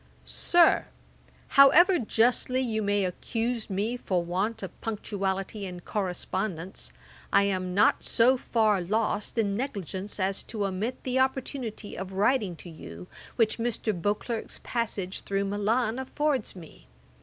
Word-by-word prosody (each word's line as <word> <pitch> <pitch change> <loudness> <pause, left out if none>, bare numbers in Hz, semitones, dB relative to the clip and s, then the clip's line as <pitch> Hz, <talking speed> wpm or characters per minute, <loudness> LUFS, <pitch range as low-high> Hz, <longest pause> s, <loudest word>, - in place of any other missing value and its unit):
'SIR, 345 -1 +4 0.6
'However 330 +6 +7
justly 245 +2 +2
you 225 -4 -1
may 205 -1 +1
accuse 225 +5 -2
me 205 +5 -1
for 180 -7 -1
want 200 +6 -1
of 190 - -8
punctuality 200 -2 -3
in 180 -2 -6
correspondence, 190 -2 -3 0.4
I 200 - +5
am 185 -2 -1
not 205 - +4
so 245 +3 +4
far 220 -5 +1
lost 210 +4 -1
in 205 -3 +1
negligence 200 - -4
as 190 +1 0
to 210 -3 -3
omit 200 +6 -3
the 260 0 0
opportunity 260 -5 -2
of 190 +1 -6
writing 205 -2 +2
to 175 - -12
you, 85 - -10 0.3
which 225 0 +2
Mr. 230 -2 -1
Beauclerk's 205 +5 -2
passage 210 -5 -2
through 200 0 -1
Milan 215 +4 0
affords 270 -2 -1
me. 160 - -13
210 Hz, 130 wpm, -28 LUFS, 190-235 Hz, 0.6 s, However